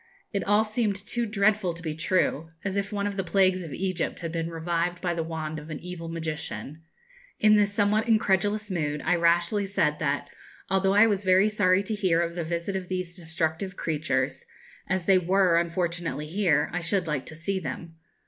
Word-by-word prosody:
It 200 - 0
all 205 +2 +4
seemed 215 -1 0
too 230 +4 -2
dreadful 205 -3 +2
to 170 - -10
be 155 -2 -2
true 160 -1 0 0.2
as 195 -1 -1
if 200 0 -1
one 200 -1 -1
of 200 -1 -3
the 195 - 0
plagues 185 +1 +3
of 165 -4 -7
Egypt 185 0 -2
had 165 -1 -4
been 165 0 -2
revived 170 +1 -1
by 175 -2 -1
the 170 - -2
wand 160 -1 -4
of 150 +2 -11
an 155 - -5
evil 175 -2 -7
magician. 160 -2 -5 0.6
In 215 0 +6
this 205 -1 +3
somewhat 205 +2 +2
incredulous 210 -1 +2
mood 150 -4 -2
I - - +3
rashly 175 +4 +2
said 150 -6 +1
that, 145 -1 -1 0.4
although 195 0 +2
I 210 +2 +8
was 205 -3 +1
very 190 +2 +5
sorry 195 -2 +3
to 215 - -3
hear 185 -5 +2
of 170 0 0
the 170 0 -3
visit 170 +4 -3
of 185 -1 -3
these 185 -1 -3
destructive 165 +2 -3
creatures, 155 - -1 0.5
as 190 -2 0
they 190 0 +5
were 180 -1 +3
unfortunately 170 -2 -2
here, 160 -3 +1
I 175 - -1
should 180 +2 0
like 150 -4 -2
to 160 - -8
see 190 +5 -2
them. 165 -2 -7
180 Hz, 195 wpm, -27 LUFS, 165-200 Hz, 0.6 s, I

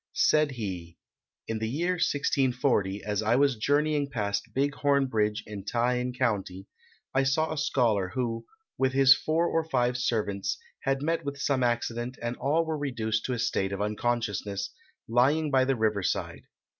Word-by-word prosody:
Said 150 -2 +3
he: 90 -8 -6 0.5
"In 110 -1 -2
the 110 0 -2
year 170 +8 0
1640, 130 - +1
as 105 0 -1
I 110 +2 +2
was 140 0 +3
journeying 145 +4 +1
past 100 -5 -2
Big 140 +2 0
Horn 140 -2 +2
Bridge 110 -3 0
in 105 -2 -7
Ta 120 +4 0
in 125 0 -1
County, 100 -7 -2 0.5
I 135 - +3
saw 155 +4 +1
a - - -6
scholar, 115 -10 +1
who, 115 -3 -2 0.3
with 130 0 +2
his 135 0 +7
four 160 +2 0
or 165 -1 +1
five 125 -5 0
servants, 100 -5 -1 0.2
had 135 0 -1
met 165 +2 0
with 140 0 -4
some 140 -1 0
accident 120 +1 -1
and 120 +1 -3
all 160 +4 +1
were 160 -1 -2
reduced 115 -6 -2
to 130 - -1
a - - -2
state 95 -4 0
of 100 - -3
unconsciousness, 105 -2 -2 0.4
lying 140 +6 +2
by 130 -1 +4
the 135 0 +1
river 110 -3 +1
side. - - -3
125 Hz, 170 wpm, -28 LUFS, 105-140 Hz, 0.5 s, his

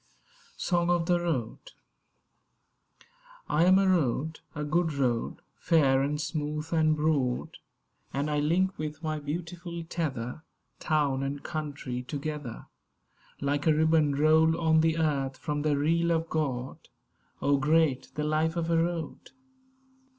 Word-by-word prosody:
SONG 175 -1 0
OF 175 -1 +2
THE 175 0 +2
ROAD 150 -10 -3 1.7
I 160 +3 +3
AM 185 +1 +6
a 195 0 +3
Road; 160 -3 +1 0.2
a 150 - -3
good 160 +2 +1
road, 125 -5 -1 0.2
fair 140 -5 +3
and 145 +2 -1
smooth 150 +1 -3
and 155 -1 +3
broad; 150 -5 0 0.5
And 140 +2 -1
I 150 - +1
link 180 +6 +1
with 155 +1 -5
my 155 -1 -2
beautiful 170 +3 -5
tether 150 -6 -4 0.4
Town 145 -4 +1
and 140 +1 -4
Country 145 -6 -4
together, 145 -2 -5 0.8
Like 145 +2 0
a 155 - +5
ribbon 155 -2 +3
rolled 160 +2 +4
on 160 -1 +3
the 160 0 +2
earth, 140 -4 0
from 145 +2 -3
the 150 -1 +1
reel 165 +4 +2
of 165 0 -1
God. 135 -5 -3 0.5
Oh, 140 0 +2
great 150 -1 +2
the 150 - -2
life 155 +2 +1
of 170 -1 -1
a 165 - +3
Road! 165 -1 -2
155 Hz, 135 wpm, -28 LUFS, 145-165 Hz, 1.7 s, AM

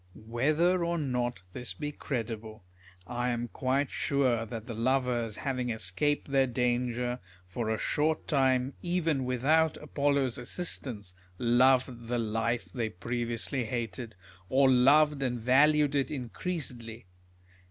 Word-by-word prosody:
Whether 155 +11 +1
or 170 0 0
not 125 - -2
this 125 - -5
be 150 -1 -4
credible, 110 -7 -5 0.4
I 120 +4 -2
am 120 0 -2
quite 135 +3 0
sure 130 -6 +1
that 110 0 -6
the 120 - -6
lovers, 120 -1 0
having 125 -2 -2
escaped 110 +8 -1
their 135 -1 +4
danger, 125 0 -1 0.3
for 110 +5 -3
a 110 - 0
short 155 +7 0
time 130 -2 +2
even 165 -6 0
with 125 0 -2
out 160 +1 +4
Apollo's 140 -4 0
assistance, 120 - -3 0.2
loved 125 0 +3
the 120 +1 0
life 115 +1 -1
they 115 -4 -3
previously 120 +5 -2
hated; 115 -1 -4 0.3
or 135 0 +5
loved 145 +3 +5
and 125 -2 -1
valued 145 +4 +4
it 140 -2 +1
increasedly. 125 - -5
125 Hz, 130 wpm, -30 LUFS, 115-140 Hz, 0.4 s, or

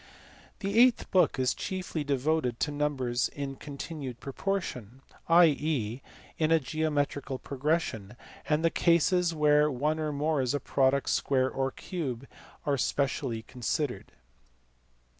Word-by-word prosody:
The 200 +3 +1
eighth 250 -1 +4
book 185 -5 +3
is 130 -1 +2
chiefly 185 -5 -4
devoted 140 -2 0
to 150 - +1
numbers 135 -4 0
in 140 -1 -5
continued 140 -3 -7
proportion, 135 - -4 0.3
i.e. 150 -8 +3 0.4
in 155 0 +2
a 165 - +5
geometrical 145 -2 -1
progression; 135 - -2 0.3
and 155 +2 +2
the 165 - +3
cases 170 0 +3
where 150 0 +4
one 150 +4 -1
or 155 -1 -1
more 150 0 0
is 130 +2 0
a - - 0
product, 135 0 +1
square, 130 -1 +1
or 135 0 -1
cube 135 -7 -5 0.4
are 140 -3 +1
specially 125 -1 -1
considered. 125 +4 -3
145 Hz, 125 wpm, -29 LUFS, 130-160 Hz, 0.4 s, a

